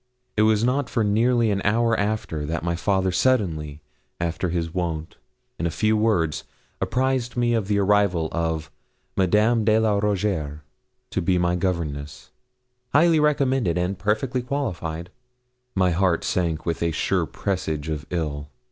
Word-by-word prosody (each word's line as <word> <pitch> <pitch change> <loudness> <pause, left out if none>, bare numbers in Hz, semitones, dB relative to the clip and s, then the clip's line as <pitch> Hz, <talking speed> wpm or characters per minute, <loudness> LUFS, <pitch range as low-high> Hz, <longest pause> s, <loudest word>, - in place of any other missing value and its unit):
It 110 - +3
was 110 0 +2
not 130 +2 +1
for 115 - +1
nearly 115 +2 +2
an 100 -1 0
hour 115 +2 +2
after, 100 -7 -2
that 80 0 -2
my 85 0 0
father 95 +1 +1
suddenly, 80 - 0 0.4
after 85 +1 -1
his 85 -1 -2
wont, 80 -3 -3 0.4
in 85 - 0
a - - 0
few 110 +6 +1
words, 105 -8 +1 0.4
apprised 130 -1 0
me 120 -1 +2
of 110 -4 0
the 105 -1 +1
arrival 100 -4 +2
of 80 -2 -2 0.4
Madame 105 +5 +3
de 110 0 +4
la 110 -2 +2
Rougierre 95 -8 -1 0.5
to - - -1
be 90 +1 +2
my 90 0 +1
governess, 85 -6 -3 0.6
highly 160 +2 +5
recommended 135 - +2
and 90 +2 -1
perfectly 110 +6 0
qualified. 90 - -3 0.6
My 95 -2 +3
heart 90 -1 +1
sank 85 -3 -1
with 85 - -2
a 85 - +2
sure 80 - 0
presage 80 -6 -3
of 75 -2 -4
ill. 75 -4 -3
95 Hz, 150 wpm, -24 LUFS, 85-110 Hz, 0.6 s, highly